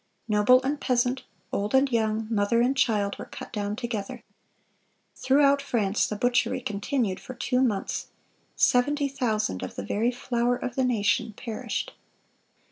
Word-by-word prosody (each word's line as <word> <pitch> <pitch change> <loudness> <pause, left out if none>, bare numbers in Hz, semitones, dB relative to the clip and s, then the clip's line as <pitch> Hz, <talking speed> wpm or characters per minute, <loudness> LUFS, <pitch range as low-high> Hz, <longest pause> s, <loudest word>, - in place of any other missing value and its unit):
Noble 215 +4 +5
and 285 +2 -2
peasant, 250 +1 0 0.3
old 205 +5 -1
and 265 0 +4
young, 220 -1 0
mother 215 +2 +2
and 250 +3 +2
child, 210 -6 +1
were - - -6
cut - - -10
down 205 -1 -2
together. 225 -4 -5 0.9
Throughout 280 +1 +3
France 215 -7 0
the 210 - -3
butchery 245 +5 +1
continued 215 -2 -2
for 255 - -9
two 250 +1 0
months. 215 -7 -1 0.5
Seventy 285 +3 +3
thousand 220 - -1
of 95 - -6
the 100 - -5
very 220 - +1
flower 245 0 0
of 245 0 -4
the 260 - +2
nation 230 -1 +1
perished. 225 -3 -4
240 Hz, 145 wpm, -26 LUFS, 210-260 Hz, 0.9 s, Noble